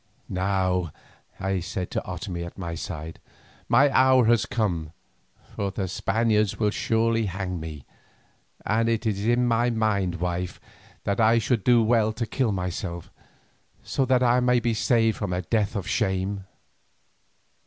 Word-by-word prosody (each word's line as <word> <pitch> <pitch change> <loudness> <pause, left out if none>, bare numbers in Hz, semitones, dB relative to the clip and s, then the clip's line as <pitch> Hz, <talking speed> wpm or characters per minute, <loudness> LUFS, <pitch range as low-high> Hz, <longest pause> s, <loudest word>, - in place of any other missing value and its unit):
"Now," 95 -2 0 0.5
I 95 0 -1
said 90 +1 -4
to - - -1
Otomie 90 -1 -5
at 85 - -9
my 85 -3 -4
side, 80 -1 -6 0.5
"my 130 +5 +6
hour 130 -2 +5
has 115 -2 +3
come, 85 -9 -2 0.6
for 100 - -1
the 95 0 -3
Spaniards 105 +2 +1
will 105 -2 +1
surely 115 0 +1
hang 90 -1 -4
me, 80 -3 -8 0.8
and 115 +2 +1
it 115 0 -1
is 100 -2 -1
in 120 +1 +3
my 120 0 +2
mind, 105 -6 0
wife, 90 +1 -3 0.4
that 100 +2 -1
I 115 +1 +5
should 115 -2 0
do 120 0 +5
well 110 -1 +2
to 115 +2 -3
kill 120 0 0
myself, 90 -2 -4 0.7
so 135 - 0
that 130 0 +3
I 125 0 +4
may 125 0 +3
be 120 -1 0
saved 115 0 +2
from 105 -4 -3
a 90 +1 -2
death 105 +2 0
of 100 -3 -3
shame." 95 -2 -1
105 Hz, 155 wpm, -25 LUFS, 90-115 Hz, 0.8 s, my